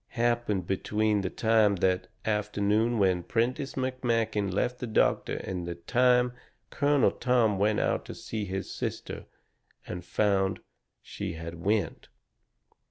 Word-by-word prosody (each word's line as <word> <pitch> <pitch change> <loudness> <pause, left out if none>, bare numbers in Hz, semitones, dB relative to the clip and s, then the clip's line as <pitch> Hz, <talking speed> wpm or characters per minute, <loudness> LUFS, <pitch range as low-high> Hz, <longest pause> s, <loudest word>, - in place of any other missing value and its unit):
Must 110 - -49
of - - -22
happened 120 -6 +1
between 105 +3 0
the 95 - -2
time 110 -2 +3
that 90 0 +1 0.2
afternoon 105 +2 +1
when 95 -3 +3
Prentiss 125 - -1
McMakin 115 -6 0
left 125 +6 -1
the 125 - -4
doctor 110 - +1
and 90 -2 -4
the 85 - -4
time 125 +6 +3 0.4
Colonel 145 -4 +3
Tom 115 -6 +2
went 105 +1 +2
out - - 0
to - - -8
see 110 -2 -4
his 95 0 -4
sister - - -5 0.6
and 90 -1 -6
found 95 0 +1 0.4
she - - -5
had 85 +1 -7
went. 100 -4 0
105 Hz, 140 wpm, -28 LUFS, 95-120 Hz, 0.6 s, time